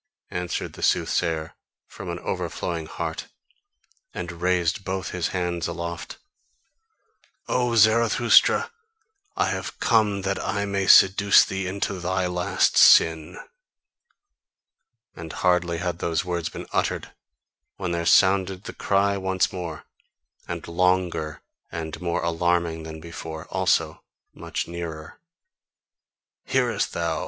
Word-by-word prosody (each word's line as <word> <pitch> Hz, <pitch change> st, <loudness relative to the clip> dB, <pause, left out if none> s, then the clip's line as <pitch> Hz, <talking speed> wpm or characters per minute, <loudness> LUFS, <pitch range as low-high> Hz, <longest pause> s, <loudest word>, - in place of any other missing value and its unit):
answered 90 Hz, -1 st, -3 dB
the -, -, -11 dB
soothsayer 80 Hz, -1 st, 0 dB, 0.3 s
from -, -, -9 dB
an -, -, -3 dB
overflowing 85 Hz, -2 st, -4 dB
heart, 80 Hz, -1 st, -5 dB, 0.9 s
and 90 Hz, -1 st, -4 dB
raised 90 Hz, 0 st, +1 dB
both 95 Hz, -1 st, -4 dB
his 90 Hz, -2 st, -1 dB
hands 90 Hz, -2 st, -2 dB
aloft 85 Hz, 0 st, -6 dB, 1.3 s
"O 125 Hz, -2 st, 0 dB
Zarathustra, 115 Hz, +2 st, +4 dB, 0.7 s
I -, -, +2 dB
have -, -, -5 dB
come 105 Hz, -4 st, +2 dB
that 100 Hz, 0 st, -2 dB
I 100 Hz, +1 st, -1 dB
may 100 Hz, -1 st, -1 dB
seduce 100 Hz, +1 st, +7 dB
thee 95 Hz, 0 st, -4 dB
to 95 Hz, -, -1 dB
thy 95 Hz, +1 st, -1 dB
last 90 Hz, +2 st, +1 dB
sin!" 80 Hz, -1 st, +5 dB, 1.8 s
And 80 Hz, -1 st, -8 dB
hardly 90 Hz, -1 st, +1 dB
had 90 Hz, -1 st, -3 dB
those 85 Hz, 0 st, -1 dB
words 85 Hz, -2 st, -2 dB
been -, -, -8 dB
uttered -, -, -1 dB, 0.6 s
when 90 Hz, -3 st, -4 dB
there 85 Hz, -1 st, -2 dB
sounded 95 Hz, +1 st, +3 dB
the -, -, -7 dB
cry 100 Hz, 0 st, +1 dB
once 95 Hz, -1 st, 0 dB
more, 85 Hz, -4 st, -6 dB, 0.6 s
and -, -, -6 dB
longer 90 Hz, -3 st, 0 dB, 0.3 s
and 80 Hz, -1 st, -6 dB
more 85 Hz, -1 st, -1 dB
alarming 85 Hz, -1 st, 0 dB
than 80 Hz, 0 st, -8 dB
before 80 Hz, -1 st, -8 dB
also -, -, 0 dB, 0.3 s
much -, -, -5 dB
nearer. 85 Hz, -2 st, -7 dB, 1.3 s
"Hearest -, -, 0 dB
thou? -, -, -1 dB
90 Hz, 115 wpm, -24 LUFS, 85-95 Hz, 1.8 s, seduce